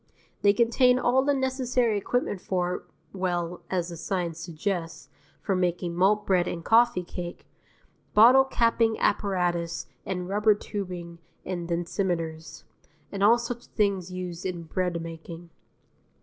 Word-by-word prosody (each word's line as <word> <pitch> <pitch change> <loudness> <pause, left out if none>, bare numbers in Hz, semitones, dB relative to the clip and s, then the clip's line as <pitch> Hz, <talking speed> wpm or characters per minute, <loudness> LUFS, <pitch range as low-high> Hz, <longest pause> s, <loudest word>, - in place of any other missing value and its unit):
They 200 - +6
contain 240 +3 +4
all 255 +1 +3
the 285 0 +2
necessary 255 -3 0
equipment 205 -1 -1
for 180 -1 -2 0.3
well, 175 -2 -2
as 180 -2 -1
the 170 - -7
signs 170 -1 -3
suggest, 170 -4 -4 0.3
for 195 - 0
making 180 -1 -1
malt 195 +4 +2
bread 180 -2 +2
and 170 -1 -5
coffee 230 -5 +4
cake 175 0 -7 0.7
bottle 245 +5 +8
capping 230 -3 +2
apparatus 175 -4 0 0.2
and 180 -2 -4
rubber 210 +2 +3
tubing 180 -5 -6 0.3
and 175 -2 -4
densimeters, 170 -2 -3 0.5
and 200 -1 -2
all 225 +3 +7
such 240 0 -5
things 195 -4 0
used 180 -1 -5
in 180 -3 -4
breadmaking. 170 -1 -4
185 Hz, 125 wpm, -27 LUFS, 175-215 Hz, 0.7 s, bottle